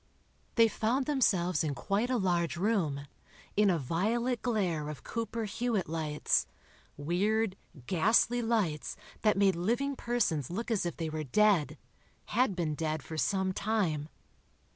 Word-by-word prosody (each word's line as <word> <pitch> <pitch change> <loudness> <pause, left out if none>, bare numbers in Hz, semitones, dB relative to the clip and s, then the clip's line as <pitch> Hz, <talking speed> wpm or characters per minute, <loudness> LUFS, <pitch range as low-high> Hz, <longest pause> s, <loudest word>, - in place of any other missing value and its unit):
They 230 -2 +6
found 235 +5 0
themselves 190 - +2
in 145 -3 -1
quite 210 - -1
a 255 - +2
large 175 -4 0
room, 175 -8 0 0.5
in 210 0 +4
a 175 - +3
violet 220 - 0
glare 180 -11 -1
of 150 -4 -8
Cooper 230 0 -3
Hewitt 220 -1 -1
lights—weird, 170 +5 -1 0.3
ghastly 225 - +3
lights, 215 -10 0 0.3
that 210 -2 +3
made 195 -2 +4
living 240 +11 0
persons 215 - 0
look 230 +7 -4
as 200 -5 +1
if 170 - -5
they 160 -2 -3
were 155 0 -3
dead—had 205 - 0
been 165 -4 -1
dead 155 -1 -2
for 160 - -7
some 190 +3 0
time. 180 -9 -1
190 Hz, 135 wpm, -31 LUFS, 160-225 Hz, 0.5 s, They